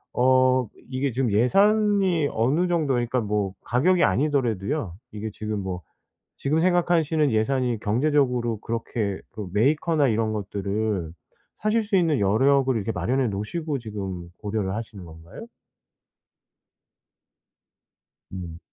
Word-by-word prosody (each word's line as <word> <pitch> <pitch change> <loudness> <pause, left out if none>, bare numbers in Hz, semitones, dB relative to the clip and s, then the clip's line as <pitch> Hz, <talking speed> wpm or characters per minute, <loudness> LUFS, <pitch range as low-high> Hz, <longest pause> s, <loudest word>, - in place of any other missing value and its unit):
어 130 -1 +4 0.2
이게 130 +1 -1
지금 125 -2 0
예산이 195 - +3
어느 140 +11 +1
정도 160 -6 +1
그러니까 120 +1 0
뭐 105 -2 -1
가격이 170 +9 +2
아니더라도요. 120 - 0 0.2
이게 110 +1 -5
지금 105 -1 -4
뭐 90 -2 -4 0.6
지금 155 +4 0
생각하시는 165 -4 +2
예산이 120 0 0
경제적으로 125 -1 +1
그렇게 115 -3 -3
그 105 -4 -6
메이커나 145 +6 +2
이런 110 -1 0
것들을 100 -3 -2 0.5
사실 215 +1 +1
수 205 -2 0
있는 160 - +2
여력을 130 +6 +3
이렇게 110 +1 -2
마련해 130 0 0
놓으시고 140 - -3
지금 95 -6 -6
고려를 105 -2 -2
하시는 110 -4 -7
건가요? 80 0 -11 2.8
음. 85 -3 -7
120 Hz, 285 characters per minute, -24 LUFS, 105-150 Hz, 2.8 s, 어